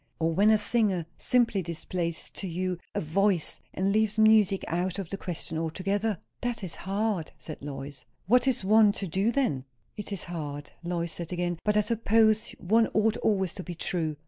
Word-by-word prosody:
Or 165 Hz, 0 st, 0 dB
when 200 Hz, +5 st, +4 dB
a 220 Hz, -, +6 dB
singer 210 Hz, -6 st, +2 dB
simply 235 Hz, -5 st, +2 dB
displays 170 Hz, 0 st, -3 dB
to 195 Hz, -, -5 dB
you 180 Hz, +1 st, -2 dB, 0.2 s
a -, -, 0 dB
VOICE, 180 Hz, +2 st, +1 dB
and 190 Hz, +1 st, 0 dB
leaves 215 Hz, 0 st, +1 dB
music 215 Hz, -3 st, +5 dB
out 180 Hz, +2 st, -1 dB
of 195 Hz, -5 st, -5 dB
the -, -, -3 dB
question 170 Hz, -3 st, -4 dB
altogether." 195 Hz, +6 st, -1 dB, 0.2 s
"That 240 Hz, -3 st, -2 dB
is 180 Hz, -, -3 dB
hard!" 195 Hz, -2 st, -2 dB
said 155 Hz, -, -9 dB
Lois. 140 Hz, -1 st, -7 dB, 0.2 s
"What 250 Hz, +7 st, +4 dB
is 255 Hz, -7 st, +1 dB
one 210 Hz, +1 st, +5 dB
to 200 Hz, -, -3 dB
do 195 Hz, +6 st, +1 dB
then?" 240 Hz, -, 0 dB, 0.3 s
"It 210 Hz, 0 st, -7 dB
is 200 Hz, -, -2 dB
hard," 145 Hz, -4 st, -6 dB
Lois 170 Hz, -1 st, -2 dB
said 170 Hz, 0 st, -6 dB
again. 175 Hz, -1 st, -2 dB
"But 210 Hz, 0 st, +2 dB
I -, -, +6 dB
suppose 220 Hz, 0 st, +2 dB
one 225 Hz, +5 st, +3 dB
ought 215 Hz, 0 st, +3 dB
always 190 Hz, -5 st, +1 dB
to 185 Hz, -, -6 dB
be 175 Hz, -, -6 dB
true." 160 Hz, -2 st, -2 dB
190 Hz, 185 wpm, -28 LUFS, 170-215 Hz, 0.3 s, a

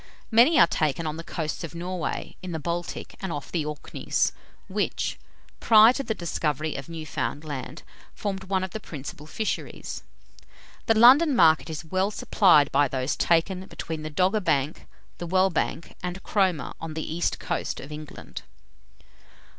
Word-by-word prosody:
Many 245 Hz, +8 st, +6 dB
are -, -, +9 dB
taken 155 Hz, 0 st, -1 dB
on 155 Hz, 0 st, -3 dB
the 165 Hz, -, -6 dB
coasts 160 Hz, 0 st, -4 dB
of 165 Hz, 0 st, -7 dB
Norway, 175 Hz, 0 st, -4 dB
in 185 Hz, -2 st, -6 dB
the 160 Hz, -, -2 dB
Baltic, 170 Hz, +3 st, -4 dB
and 190 Hz, -3 st, -3 dB
off 145 Hz, -3 st, -5 dB
the 165 Hz, -3 st, 0 dB
Orkneys, 150 Hz, 0 st, -1 dB, 0.4 s
which, -, -, -2 dB, 0.4 s
prior 220 Hz, +1 st, +7 dB
to 275 Hz, -, -2 dB
the 220 Hz, -5 st, -2 dB
discovery 155 Hz, -3 st, -2 dB
of 135 Hz, +3 st, -6 dB
Newfoundland, 155 Hz, -3 st, -5 dB, 0.3 s
formed 195 Hz, -2 st, -4 dB
one 190 Hz, 0 st, 0 dB
of 190 Hz, -, -4 dB
the 220 Hz, -, -5 dB
principal 150 Hz, -3 st, -8 dB
fisheries. 215 Hz, +6 st, -4 dB, 0.9 s
The 225 Hz, -, +4 dB
London 270 Hz, +6 st, +7 dB
market 160 Hz, -5 st, +5 dB
is 160 Hz, +1 st, -5 dB, 0.3 s
supplied 160 Hz, -8 st, +4 dB
by 145 Hz, +1 st, +4 dB
those 130 Hz, +1 st, -1 dB
taken 180 Hz, +3 st, +1 dB
between 160 Hz, -2 st, -6 dB
the 155 Hz, -, -5 dB
Dogger 185 Hz, +7 st, +2 dB
Bank, 155 Hz, -5 st, -1 dB, 0.3 s
the 175 Hz, -, -4 dB
Well 185 Hz, +2 st, +3 dB
Bank, 165 Hz, 0 st, -2 dB
and 180 Hz, +1 st, -5 dB
Cromer, 185 Hz, -9 st, 0 dB
on 160 Hz, -1 st, -6 dB
the 160 Hz, 0 st, -4 dB
east 175 Hz, -, 0 dB
coast -, -, -3 dB
of 140 Hz, -, -9 dB
England. 150 Hz, 0 st, -8 dB
165 Hz, 155 wpm, -26 LUFS, 155-190 Hz, 0.9 s, are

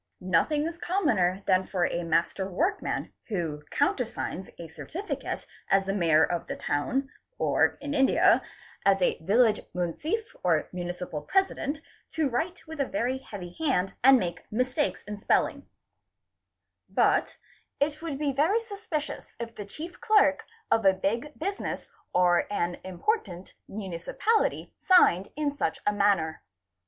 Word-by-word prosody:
Nothing 190 Hz, -, +2 dB
is 335 Hz, +1 st, -4 dB
commoner 205 Hz, -, +1 dB
— -, -, -36 dB
than 185 Hz, 0 st, +3 dB
for 180 Hz, -3 st, +1 dB
a 170 Hz, -, -1 dB
master 170 Hz, +3 st, 0 dB
workman 355 Hz, -, -1 dB
who 165 Hz, -8 st, -2 dB
countersigns 240 Hz, -9 st, -1 dB
a 170 Hz, -, -8 dB
certificate 350 Hz, -, -5 dB, 0.2 s
as 195 Hz, 0 st, +4 dB
the 195 Hz, -, -1 dB
Mayor 165 Hz, -5 st, +4 dB
of 175 Hz, -1 st, -1 dB
the -, -, -3 dB
Town 250 Hz, -, -1 dB, 0.3 s
or, -, -, +2 dB
in 290 Hz, 0 st, -3 dB
India, 270 Hz, -2 st, +5 dB, 0.4 s
as 195 Hz, 0 st, +4 dB
a 180 Hz, -, +1 dB
Village 215 Hz, +6 st, +3 dB, 0.2 s
Munsiff 305 Hz, -, -2 dB
or 165 Hz, -4 st, +2 dB
Municipal 175 Hz, -3 st, -4 dB
President 315 Hz, -, 0 dB, 0.3 s
to 315 Hz, -2 st, +1 dB
write 320 Hz, +9 st, -2 dB
with 320 Hz, -1 st, -9 dB
a 260 Hz, -2 st, 0 dB
heavy 180 Hz, -4 st, -7 dB
hand 255 Hz, -, +1 dB
and 265 Hz, +1 st, +8 dB
make 175 Hz, -6 st, -4 dB
mistakes 255 Hz, +6 st, 0 dB
in 210 Hz, 0 st, -7 dB
spelling; -, -, +1 dB, 1.2 s
but -, -, +2 dB, 0.4 s
it 300 Hz, +2 st, 0 dB
would 320 Hz, -5 st, -4 dB
be 285 Hz, -1 st, 0 dB
very 320 Hz, -, +3 dB
suspicious 400 Hz, -9 st, -5 dB
if 230 Hz, -1 st, -5 dB
the 205 Hz, -, -7 dB
chief 320 Hz, -, -9 dB
clerk 415 Hz, -11 st, +4 dB, 0.3 s
of 225 Hz, -, +4 dB
a 195 Hz, -1 st, +6 dB
big 230 Hz, +10 st, -2 dB
business 395 Hz, +5 st, -3 dB, 0.3 s
or 175 Hz, -1 st, +3 dB
an 175 Hz, -3 st, -1 dB
important 185 Hz, -, -2 dB
municipality 200 Hz, -, -1 dB
signed 200 Hz, -, +5 dB
in 300 Hz, -1 st, 0 dB
such -, -, -1 dB
a 210 Hz, -, +3 dB
manner. 200 Hz, -6 st, +2 dB
220 Hz, 140 wpm, -28 LUFS, -, 1.2 s, and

